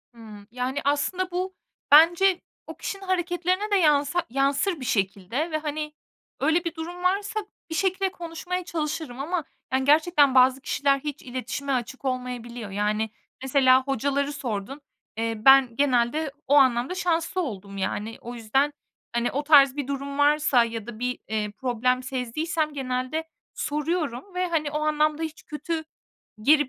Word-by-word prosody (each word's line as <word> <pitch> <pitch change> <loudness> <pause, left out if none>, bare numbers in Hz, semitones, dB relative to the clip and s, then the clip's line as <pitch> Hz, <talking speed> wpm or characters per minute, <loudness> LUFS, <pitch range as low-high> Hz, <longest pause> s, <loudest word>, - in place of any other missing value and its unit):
Hımm. 210 -3 -12
Yani, 255 +3 -2
aslında 360 +6 0
bu 370 +1 -3 0.4
bence 345 +5 +6 0.3
o - - -9
kişinin 390 0 -5
hareketlerine 365 +2 0
de - - +4
yansa 300 -1 +3
yansır 275 +7 +1
bir 255 - -6
şekilde 210 - -1
ve, 310 - +1
hani, 300 0 -4 0.5
öyle 330 +2 +2
bir 335 -1 -4
durum 345 +2 -7
varsa 400 +3 0 0.3
bir 320 - -3
şekilde 380 +2 +1
konuşmaya 350 +1 -5
çalışırım 305 -5 -4
ama, 330 +3 -2 0.3
yani, 265 0 +1
gerçekten 295 -2 +4
bazı 255 +1 +5
kişiler 275 0 +1
hiç 295 +1 -6
iletişime 260 +2 -4
açık 255 +2 -4
olmayabiliyor. 245 -3 -4
Yani, 210 +2 0 0.3
mesela 260 -1 +4
hocaları 280 +2 -1
sordun. 255 +1 -4 0.4
Eee, 225 0 -1
ben 270 -3 +7
genelde 275 +3 +1 0.2
o 285 - +4
anlamda 260 +4 +4
şanslı 345 0 0
oldum, 200 - -6
yani. 210 +3 -3
O 240 +1 -7
yüzden, 270 +6 +1 0.4
hani, 235 0 0
o 285 +3 -2
tarz 280 -3 +6
bir 285 -2 -3
durum 280 0 -4
varsa 290 -3 +4
ya 230 -1 -5
da 230 -2 -8
bir, 250 0 -2
eee, 215 -1 -2
problem 250 +2 0
sezdiysem 295 +5 -2
genelde 255 +3 -2 0.3
soruyorum 300 +1 -2
ve, 365 0 0
hani, 310 -4 -1
o 300 - -1
anlamda 305 +1 +1
hiç 315 0 -6
kötü 315 +2 -4 0.6
geri 295 +1 +5
285 Hz, 150 wpm, -25 LUFS, 250-320 Hz, 0.6 s, ben